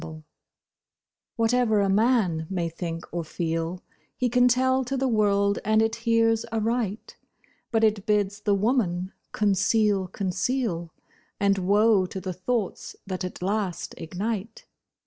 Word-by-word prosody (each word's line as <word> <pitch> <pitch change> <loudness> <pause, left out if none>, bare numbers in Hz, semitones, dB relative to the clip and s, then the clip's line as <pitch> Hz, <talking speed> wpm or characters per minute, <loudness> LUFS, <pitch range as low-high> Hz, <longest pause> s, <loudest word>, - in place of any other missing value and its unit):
BLIND 160 -1 -9 1.1
Whatever 230 -1 +2
a 200 - +2
man 195 -6 +2
may 175 -3 -1
think 165 0 -5
or 170 0 -3
feel 165 +2 -3 0.3
He 250 - +1
can 245 +1 +4
tell 260 +1 +2
to 270 +2 -3
the 265 +1 +1
world 200 -3 +2
and 215 +1 +3
it 225 +1 +1
hears 230 -1 +2
aright; 225 -1 -2 0.5
But 225 -1 +2
it 215 -1 +2
bids 205 -1 +1
the 205 -1 +1
woman 195 -4 0 0.2
conceal, 205 -1 +2
conceal, 185 -1 -2 0.5
And 200 -1 +2
woe 200 +1 +3
to 190 - -6
the 185 -1 -4
thoughts 200 +3 -3
that 185 -1 -4
at 180 0 -6
last 195 -2 -2
ignite. 210 +5 -4
205 Hz, 135 wpm, -26 LUFS, 185-225 Hz, 1.1 s, can